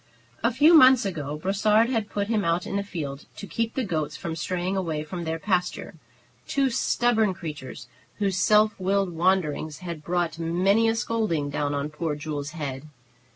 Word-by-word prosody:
A 230 - +2
few 300 +7 +5
months 260 -7 +7
ago 150 -6 -4
Brossard 210 +6 +2
had 225 -5 -1
put 200 -1 -2
him 215 -2 0
out 170 +1 0
in - - -4
the 200 - +1
field 150 -7 -6
to - - -8
keep 230 +2 -3
the 265 - 0
goats 160 -8 -2
from 165 -1 -5
straying 180 +3 -2
away 165 -5 -2
from 170 +2 -6
their 160 0 -2
pasture, 180 0 -1 0.5
two 275 -2 +1
stubborn 225 -4 +1
creatures, 150 -7 -8 0.3
whose 200 -3 -1
self 210 +3 +3
willed 195 -1 0
wanderings 165 -4 0
had 170 -3 -6
brought 170 -1 -1
many 185 +7 +2
a 225 - +1
scolding 210 -11 -1
down 145 0 -1
on 140 +1 -3
poor 150 0 -3
Jules's 150 0 -5
head. 145 -3 -5
180 Hz, 175 wpm, -25 LUFS, 155-210 Hz, 0.5 s, months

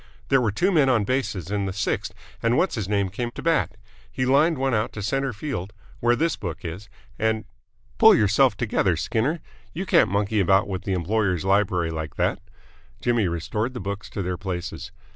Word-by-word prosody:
"There 135 -1 +4
were 115 -4 +1
two 180 - +1
men 150 -7 +4
on 120 -5 +3
bases 105 -6 -2
in 100 -1 0
the - - -2
sixth 100 +2 -1 0.3
and 115 +2 +2
What's 185 - +2
his 105 -5 -3
name 100 -2 +1
came 120 +5 -3
to - - -7
bat. 165 -8 +1 0.3
He 130 - -1
lined 145 +5 +4
one 135 0 0
out 110 0 0
to 105 - -5
centre 135 +5 0
field 110 -5 -5 0.3
where 120 0 +3
this 165 +5 +1
book 85 -5 -6
is 90 +5 -6 0.3
and 110 -1 0 0.3
" - - -35
"Pull - - +8
yourself 105 +2 +3
together, 100 -7 +1
Skinner! 130 - -1 0.3
You 185 +5 -3
can't - - +4
monkey 100 +2 0
about 95 +2 +3
with 95 -2 -5
the 95 - 0
employer's 95 0 0
library 95 -4 +2
like 80 -2 -5
that." - - 0 0.6
Jimmy 120 -5 +1
restored 105 +9 -2
the - - -3
books 100 +1 -5
to 100 - -4
their 90 0 -2
places. 90 -1 -5
105 Hz, 200 wpm, -24 LUFS, 95-125 Hz, 0.6 s, Pull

